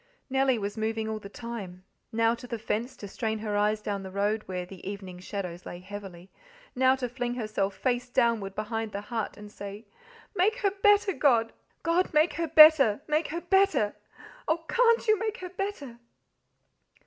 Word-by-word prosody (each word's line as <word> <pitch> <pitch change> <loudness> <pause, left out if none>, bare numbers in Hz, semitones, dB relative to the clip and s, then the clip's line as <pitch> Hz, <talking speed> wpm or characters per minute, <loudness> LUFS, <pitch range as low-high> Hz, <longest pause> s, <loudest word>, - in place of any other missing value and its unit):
Nellie 265 -1 +3
was 205 0 -4
moving 220 0 -1
all 220 0 -3
the 200 - -10
time 205 -6 -7 0.3
now 230 +1 +3
to 235 +1 -8
the 235 - -4
fence 225 +3 -3
to 205 - -8
strain 220 +2 -2
her 210 -1 -3
eyes 210 +1 +1
down 200 -1 -2
the 190 - -7
road, 205 +3 0
where 180 -1 -4
the 185 0 -12
evening 190 -3 -7
shadows 180 -2 -5
lay 175 - -7
heavily, 190 -1 -10 0.4
now 260 +1 +4
to 260 -2 -3
fling 245 0 -3
herself 215 -4 -2
face 245 +1 -1
downward 230 -6 +1
behind 220 0 -3
the 200 - -3
hut 225 -3 -2
and 210 0 -11
say, 200 +2 -8 0.5
"Make 410 +4 +3
her 395 - +2
better, 405 0 +3
God! 235 -8 +3 0.3
God, 335 0 +1
make 310 +3 +4
her 335 -1 -2
better, 305 -8 +7
make 305 +1 +1
her 335 +3 -4
better! 350 - +2 0.5
Oh! 325 +1 0
CAN'T 465 +1 +3
You 430 -1 +4
make 445 0 -2
her 365 -4 -7
better?" 365 - -5
230 Hz, 180 wpm, -28 LUFS, 205-305 Hz, 0.5 s, better